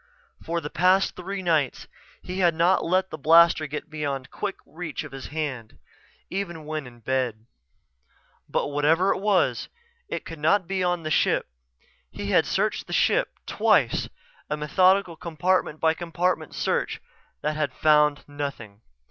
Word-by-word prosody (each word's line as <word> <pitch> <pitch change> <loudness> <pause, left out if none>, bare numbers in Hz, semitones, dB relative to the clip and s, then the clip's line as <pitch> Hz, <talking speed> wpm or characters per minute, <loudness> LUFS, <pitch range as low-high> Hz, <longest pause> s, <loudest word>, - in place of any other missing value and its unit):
For 170 +1 -2
the 150 - -6
past 185 +3 +3
three 190 +2 -5
nights 160 -6 0 0.4
he 180 +1 -5
had 175 -3 +3
not 170 +3 +3
let 185 +2 +1
the 155 - -6
blaster 165 0 +5
get 150 +2 -6
beyond 145 -4 -4
quick 200 -2 -3
reach 160 0 -6
of 155 - -10
his 135 -1 -8
hand, 140 -7 -5 0.5
even 175 -5 -4
when 155 -3 -4
in 120 -1 -15
bed. 120 -3 -2 1.0
But - - 0
whatever 155 +6 +3
it - - -5
was, 200 -1 +1 0.4
it - - -4
could 165 -2 -8
not 185 +6 +3
be 190 +1 -1
on 175 -1 0
the 155 - -3
ship. - - +2 0.6
He - - -5
had - - +4
searched - - -1
the - - -6
ship - - +2
twice, - - +2 0.4
a 150 - -1
methodical 185 +4 +3
compartment 170 0 -1
by 160 0 +3
compartment 170 -1 -2
search - - -1 0.4
that 150 0 0
had 150 -3 -1
found 150 +1 +3
nothing. 140 -8 -6
160 Hz, 155 wpm, -25 LUFS, 145-180 Hz, 1.0 s, blaster